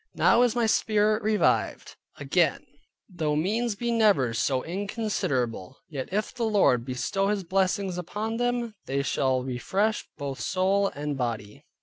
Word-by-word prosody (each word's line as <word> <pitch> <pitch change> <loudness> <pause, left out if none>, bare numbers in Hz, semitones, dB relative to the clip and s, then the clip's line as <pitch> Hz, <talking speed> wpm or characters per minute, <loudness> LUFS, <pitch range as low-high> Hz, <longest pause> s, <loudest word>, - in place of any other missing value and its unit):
Now 240 - +4
is 245 -2 +3
my 240 -1 +2
spirit 215 0 +2
revived 215 0 +1 0.2
again; - - +1 0.4
though 160 -6 -2
means 215 +8 0
be 235 +3 -2
never 205 - +3
so 130 +2 0
inconsiderable, 170 - -2
yet 135 -4 -5
if 210 +2 -1
the 250 - -8
Lord 200 - +3
bestow 130 +10 -1
His 205 -1 0
blessing 190 +1 0
upon 210 +6 -3
them, 245 -1 -1
they 140 +1 0
shall 130 -2 +1
refresh 190 - -1
both 140 -2 -5
soul 195 +2 +1
and 145 0 -3
body. 110 -4 -4
190 Hz, 140 wpm, -26 LUFS, 135-215 Hz, 0.4 s, Now